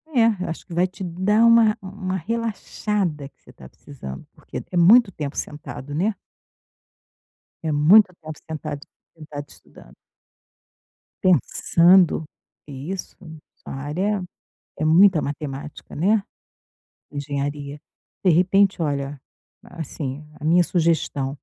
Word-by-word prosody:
É, 225 Hz, -5 st, +3 dB
eu -, -, -4 dB
acho 165 Hz, -, -6 dB
que 175 Hz, -, -10 dB
vai 175 Hz, +2 st, +2 dB
te 185 Hz, +1 st, -9 dB
dar 190 Hz, +5 st, +1 dB
uma 230 Hz, -2 st, +5 dB
uma 190 Hz, -1 st, -5 dB
relaxada 205 Hz, -5 st, -2 dB
que -, -, -44 dB
você -, -, -17 dB
tá 65 Hz, -, -14 dB
precisando, 70 Hz, -, -10 dB
porque -, -, -8 dB
é 180 Hz, -, -2 dB
muito 200 Hz, +5 st, +6 dB
tempo 150 Hz, -4 st, -5 dB
sentado, 145 Hz, -1 st, -6 dB
né. 195 Hz, +8 st, 0 dB, 1.5 s
É 160 Hz, -, -1 dB
muito 180 Hz, +7 st, +6 dB
tempo 155 Hz, -1 st, -8 dB
sentado 150 Hz, -2 st, -5 dB
estu -, -, -36 dB, 0.3 s
sentado 145 Hz, -2 st, -8 dB
estudando. -, -, -17 dB, 1.3 s
Pensando 180 Hz, -1 st, +4 dB, 0.4 s
e 140 Hz, +4 st, -7 dB
isso 190 Hz, -2 st, -6 dB
mesmo, 160 Hz, -3 st, -11 dB, 0.2 s
sua -, -, -10 dB
área 180 Hz, +9 st, -2 dB, 0.5 s
é 155 Hz, -, -1 dB
muita 175 Hz, +1 st, +6 dB
matemática, 145 Hz, 0 st, -6 dB
né. 200 Hz, +7 st, +2 dB, 0.9 s
Engenharia. 145 Hz, 0 st, -4 dB, 0.4 s
De 185 Hz, -, +5 dB
repente, 190 Hz, +3 st, +3 dB
olha, 140 Hz, -2 st, -2 dB, 0.5 s
assim, 150 Hz, -3 st, -5 dB, 0.2 s
a 150 Hz, -, -7 dB
minha 175 Hz, +3 st, +5 dB
sugestão 160 Hz, -6 st, 0 dB
165 Hz, 125 wpm, -23 LUFS, 145-195 Hz, 1.5 s, muito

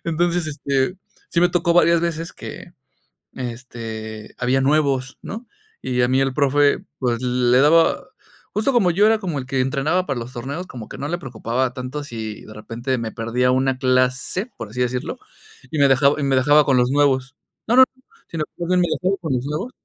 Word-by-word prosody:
Entonces, 170 Hz, +1 st, 0 dB
este, 140 Hz, +2 st, -1 dB, 0.3 s
sí 170 Hz, -, +1 dB
me 175 Hz, -, +5 dB
tocó 170 Hz, -1 st, +1 dB
varias 170 Hz, -1 st, +4 dB
veces 165 Hz, -1 st, -3 dB
que, -, -, -10 dB, 0.6 s
este, 115 Hz, -3 st, -7 dB
había 125 Hz, +2 st, +1 dB
nuevos, 135 Hz, -2 st, +1 dB
¿no?, 230 Hz, +4 st, -7 dB, 0.4 s
y 125 Hz, -1 st, 0 dB
a -, -, +3 dB
mí 130 Hz, +2 st, +2 dB
el 135 Hz, 0 st, +1 dB
profe, 145 Hz, 0 st, +2 dB
pues, 120 Hz, -3 st, -1 dB
le 125 Hz, 0 st, +2 dB
daba 165 Hz, +4 st, +4 dB, 0.5 s
justo 220 Hz, +6 st, +1 dB
como 205 Hz, -9 st, +3 dB
yo 205 Hz, +5 st, +4 dB
era 225 Hz, 0 st, +4 dB
como 175 Hz, -8 st, -3 dB
el 130 Hz, -, -7 dB
que 135 Hz, -1 st, 0 dB
entrenaba 150 Hz, +8 st, 0 dB
para 135 Hz, -3 st, -2 dB
los 120 Hz, +2 st, -7 dB
torneos, 140 Hz, +10 st, -5 dB
como 115 Hz, -4 st, -9 dB
que -, -, -9 dB
no 140 Hz, -, -3 dB
le 175 Hz, +3 st, -2 dB
preocupaba 125 Hz, -2 st, -2 dB
tanto 130 Hz, +3 st, -5 dB
si 110 Hz, -5 st, -6 dB
de 110 Hz, -, -11 dB
repente 120 Hz, +4 st, -3 dB
me 110 Hz, -1 st, -4 dB
perdía 120 Hz, +2 st, 0 dB
una 130 Hz, 0 st, +1 dB
clase, 130 Hz, -, +1 dB
por 115 Hz, -3 st, -7 dB
así 125 Hz, +4 st, -7 dB
decirlo, 125 Hz, +3 st, -2 dB, 0.5 s
y 155 Hz, -, -2 dB
me 140 Hz, -, +6 dB
dejab 140 Hz, +3 st, +3 dB
y 145 Hz, -, -1 dB
me 135 Hz, -1 st, +2 dB
dejaba 145 Hz, +3 st, +5 dB
con 135 Hz, -2 st, +3 dB
los 125 Hz, +1 st, +2 dB
nuevos. 135 Hz, -1 st, +2 dB, 0.3 s
No, 235 Hz, -, +3 dB
no, 260 Hz, -, +10 dB
no, 260 Hz, -, -28 dB, 0.2 s
sino 160 Hz, -2 st, -3 dB
más 175 Hz, 0 st, -4 dB
bien 180 Hz, 0 st, +3 dB
que 175 Hz, -, +2 dB
me -, -, +1 dB
dejaba 190 Hz, +2 st, +1 dB
con 160 Hz, -5 st, -2 dB
los 125 Hz, 0 st, -1 dB
nuevos. 150 Hz, -, -3 dB
135 Hz, 205 wpm, -21 LUFS, 125-165 Hz, 0.6 s, no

